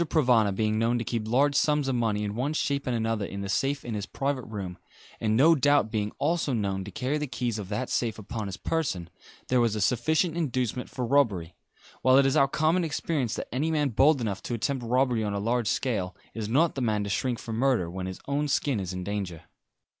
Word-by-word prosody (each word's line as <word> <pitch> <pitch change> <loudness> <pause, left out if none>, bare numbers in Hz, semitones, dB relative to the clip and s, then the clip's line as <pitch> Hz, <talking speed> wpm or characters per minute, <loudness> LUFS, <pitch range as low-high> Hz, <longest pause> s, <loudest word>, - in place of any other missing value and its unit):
Provana 120 -9 +4
being 110 +1 +1
known 115 +2 +2
to 120 - -2
keep 115 -2 -3
large 140 +5 +3
sums 150 0 +2
of 135 - +1
money 110 -4 0
in 105 -1 -3
one 130 +7 -1
shape 140 -3 -1
and 125 - 0
another 115 -2 -1
in 100 0 -5
the 100 - -4
safe 140 +7 0
in 120 - -4
his 105 -2 -3
private 135 -1 -2
room, 95 -5 -6 0.4
and 110 0 +1
no 160 +6 +7
doubt 145 -6 +3
being 105 -1 -1
also 155 -2 0
known 100 -4 -1
to 100 - -8
carry 140 +4 -2
the 150 - -2
keys 125 -3 -2
of 95 -2 -6
that 110 +5 -2
safe 115 -2 -1
upon 110 0 -5
his 95 -1 -6
person, 95 - -2 0.4
there 125 -1 +3
was 115 -2 +2
a - - -2
sufficient 155 - +1
inducement 125 -6 -1
for 125 - -3
robbery; 110 -11 +2 0.5
while 130 0 +5
it 140 - +5
is 135 +1 +2
our 140 -3 +5
common 155 +5 +1
experience 145 -6 -1
that - - -6
any 145 +6 0
man 150 -3 +1
bold 135 +5 +4
enough 105 -4 -2
to 120 - -3
attempt 130 +3 -2
robbery 125 -1 +1
on 105 -1 -2
a - - -1
large 115 +2 0
scale 100 -5 -1 0.2
is 110 -2 -4
not 155 +8 +3
the 135 - -4
man 105 -4 +1
to 100 - -4
shrink 120 +3 0
from 115 -1 -5
murder, 125 -8 +2
when 90 +2 -5
his 95 - -6
own 145 +1 0
skin 140 -4 +1
is 95 -1 -4
in 90 0 -4
danger. 95 -5 -4
120 Hz, 230 wpm, -27 LUFS, 105-140 Hz, 0.5 s, no